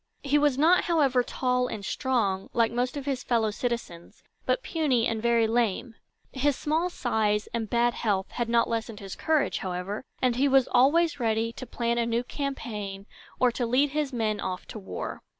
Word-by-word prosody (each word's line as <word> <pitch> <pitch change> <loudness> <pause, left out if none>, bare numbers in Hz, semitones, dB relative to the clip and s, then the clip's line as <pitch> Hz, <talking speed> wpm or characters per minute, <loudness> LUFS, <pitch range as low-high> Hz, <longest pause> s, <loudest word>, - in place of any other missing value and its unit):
He 290 +1 +3
was 290 -3 +2
not, 330 +5 +4
however, 280 -7 +3
tall 250 0 0
and 210 -5 -6
strong, 205 -8 -1
like 230 -1 +2
most 245 +3 -1
of 280 - -5
his 270 -3 -1
fellow 225 -3 +1
citizens, 220 -7 -5 0.2
but - - +1
puny 275 -8 +1
and 225 -1 -1
very 235 -1 +3
lame. 230 0 0 0.4
His 280 +1 +1
small 320 +6 0
size 215 -8 0
and 225 -2 -2
bad 240 0 +2
health 200 -3 -1
had 240 -1 -2
not 235 0 +3
lessened 225 -1 -3
his 195 -2 -7
courage, 310 -3 +1
however, 185 +4 -4 0.2
and 250 -2 +1
he 275 +2 +3
was 270 -2 +4
always 285 +5 +4
ready 225 -1 0
to 255 - -8
plan 235 0 -1
a 230 - +1
new 235 +1 0
campaign 215 -8 -5 0.3
or 250 -1 +4
to 240 0 -2
lead 270 +4 +2
his 295 -1 -1
men 220 -4 -1
off 185 -1 -4
to 215 - -7
war. 190 - -6
240 Hz, 185 wpm, -27 LUFS, 220-270 Hz, 0.4 s, not